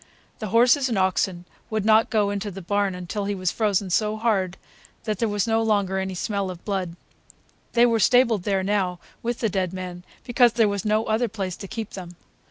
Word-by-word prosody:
The 215 - -4
horses 245 +5 +4
and 225 - -1
oxen 185 -1 0 0.2
would 215 -2 -2
not 220 0 +5
go 210 -3 +1
into 205 +1 -3
the 195 -1 -8
barn 200 +1 0
until 180 +3 -4
he 200 0 -1
was 185 -2 -1
frozen 200 -4 0
so 215 +3 +1
hard 195 -5 0 0.5
that 215 -3 -3
there 230 - +1
was 205 -1 0
no 225 -1 +1
longer 200 -4 +1
any 190 -1 -3
smell 200 0 -2
of 180 -2 -9
blood. 190 -5 -2 0.8
They 240 0 +5
were 230 -2 +2
stabled 235 -2 +4
there 195 0 0
now, 190 -3 0 0.2
with 240 0 -3
the 225 - +2
dead 185 -2 -1
man, 180 -1 -6 0.2
because 240 -2 +3
there 230 -2 +3
was 200 -2 -2
no 215 +1 +2
other 220 +3 +1
place 195 -4 -4
to 195 - -8
keep 220 +1 -6
them. 175 -2 -8
205 Hz, 205 wpm, -24 LUFS, 190-225 Hz, 0.8 s, not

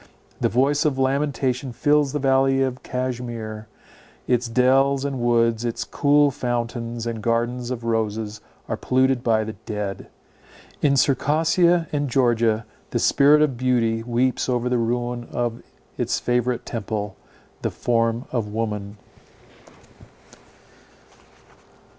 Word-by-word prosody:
The - - +1
voice 135 +6 +2
of 145 -4 +1
lamentation 135 -1 0
fills 145 +3 +2
the 150 - -1
valley 135 -1 +3
of 130 -1 -3
Cashmere; 120 -4 -4 0.6
its 125 -1 +1
dells 135 +3 +3
and 140 -2 -3
woods, 115 -1 +2
its 120 -1 -2
cool 145 0 +3
fountains, 120 -2 -3
and 115 -2 -4
gardens 120 +2 -1
of 125 -2 -4
roses, 110 -2 -2 0.3
are - - -2
polluted 130 -1 +1
by 110 -2 +2
the 110 0 -5
dead; 105 -1 -5 0.7
in 140 -2 +3
Circassia 165 +5 +3
and 145 -2 -1
Georgia 115 -3 +2 0.2
the - - -1
spirit 150 +2 +5
of 135 -5 0
beauty 120 -3 +1
weeps 125 +3 0
over 125 0 0
the 125 -1 +1
ruin 120 +1 -2
of 120 -1 -2 0.4
its - - 0
favourite 125 0 0
temple—the 105 -2 -6
form 115 0 0
of 120 -4 -1
woman. 105 -1 -4
120 Hz, 120 wpm, -23 LUFS, 115-135 Hz, 0.7 s, spirit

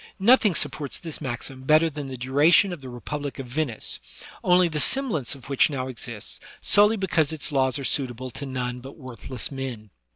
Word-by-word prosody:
Nothing 210 -2 +5
supports 145 -3 -1
this 165 -3 -7
maxim 130 +1 -4
better 155 +4 +4
than 145 -3 -5
the 130 -1 -6
duration 145 +9 +4
of 165 - -8
the 130 - -8
republic 145 +3 -5
of 135 - -5
Venice, 125 -2 -2 0.4
only 180 0 +5
the 155 -2 -2
semblance 215 - 0
of 135 -1 -14
which 140 +2 +3
now 130 -3 -3
exists, 120 -4 -7 0.2
solely 210 +2 +4
because 165 -6 +1
its 160 0 -2
laws 130 -1 +2
are 140 - -5
suitable 130 -2 -1
to 140 +3 -7
none 125 -1 -3
but 130 +2 -11
worthless 130 -2 -5
men. 125 -6 -6
135 Hz, 185 wpm, -25 LUFS, 130-160 Hz, 0.4 s, Nothing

